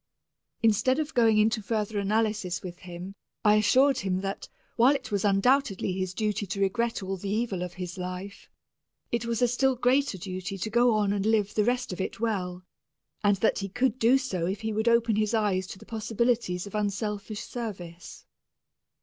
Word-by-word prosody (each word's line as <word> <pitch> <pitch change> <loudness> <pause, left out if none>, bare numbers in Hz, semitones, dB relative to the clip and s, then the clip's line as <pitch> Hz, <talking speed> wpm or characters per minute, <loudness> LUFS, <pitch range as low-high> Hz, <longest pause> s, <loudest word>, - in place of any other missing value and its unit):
Instead 225 +4 +3
of 310 0 -2
going 225 -3 +4
into 220 +1 +3
further 210 0 -2
analysis 210 -3 0
with 180 -1 -7
him, 180 +1 -8 0.3
I 210 0 +6
assured 265 +6 +4
him 190 -1 -1
that, 195 0 -5 0.3
while 250 +5 +5
it 260 -5 -6
was 200 -2 0
undoubtedly 200 0 +2
his 185 -1 -3
duty 210 -2 -1
to 195 +2 -4
regret 230 +3 0
all 190 0 -3
the 195 +2 -5
evil 210 -3 -1
of 180 -1 -5
his 180 -1 -6
life, 185 +3 -6 0.6
it 235 0 -1
was 235 +1 0
a - - +5
still 260 +2 +2
greater 255 -2 +2
duty 185 +2 -5
to 205 +4 -3
go 240 0 +4
on 205 -2 +2
and 200 -1 -1
live 210 -2 +2
the 210 - +2
rest 245 -3 0
of 180 - -4
it 190 - -4
well, 185 -5 -2 0.6
and 205 -1 +4
that - - +2
he 195 0 -4
could 245 +3 0
do 235 +4 +5
so 190 -11 -2
if 195 +3 -3
he 220 0 -2
would 220 +2 -1
open 230 -2 +3
his 215 +1 +1
eyes 195 -4 +1
to 195 - -8
the - - -14
possibilities 225 -4 -1
of 200 - -10
unselfish 210 0 -2
service. 180 -8 -7
210 Hz, 190 wpm, -27 LUFS, 190-235 Hz, 0.6 s, I